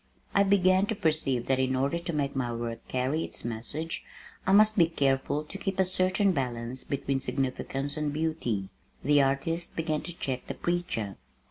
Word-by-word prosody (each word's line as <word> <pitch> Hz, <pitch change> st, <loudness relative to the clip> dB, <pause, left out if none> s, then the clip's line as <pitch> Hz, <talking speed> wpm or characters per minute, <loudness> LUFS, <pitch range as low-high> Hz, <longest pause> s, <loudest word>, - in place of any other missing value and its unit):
I 200 Hz, -, +5 dB
began 195 Hz, -1 st, +4 dB
to 220 Hz, -, -1 dB
perceive 150 Hz, -8 st, +1 dB
that 135 Hz, -1 st, +2 dB
in 130 Hz, 0 st, +2 dB
order 140 Hz, +6 st, +1 dB
to 170 Hz, 0 st, -4 dB
make 140 Hz, -3 st, -1 dB
my 125 Hz, -3 st, 0 dB
work 115 Hz, 0 st, -4 dB
carry 130 Hz, +5 st, 0 dB
its -, -, -7 dB
message, 120 Hz, +8 st, -3 dB, 0.4 s
I -, -, +4 dB
must 215 Hz, +2 st, +6 dB
be 170 Hz, -4 st, +5 dB
careful 140 Hz, -1 st, +1 dB
to 155 Hz, +6 st, -8 dB
keep 195 Hz, -2 st, -2 dB
a 190 Hz, -, +5 dB
certain 185 Hz, +2 st, +2 dB
balance 125 Hz, -4 st, -3 dB
between 140 Hz, -1 st, -1 dB
Significance 135 Hz, +2 st, -2 dB
and 150 Hz, -1 st, 0 dB
Beauty. 145 Hz, -11 st, -1 dB, 0.3 s
The 145 Hz, 0 st, +5 dB
artist 150 Hz, +5 st, 0 dB
began 155 Hz, -2 st, 0 dB
to 175 Hz, -1 st, -8 dB
check 130 Hz, -2 st, -3 dB
the -, -, -4 dB
preacher. 170 Hz, -, -2 dB
145 Hz, 175 wpm, -29 LUFS, 130-175 Hz, 0.4 s, must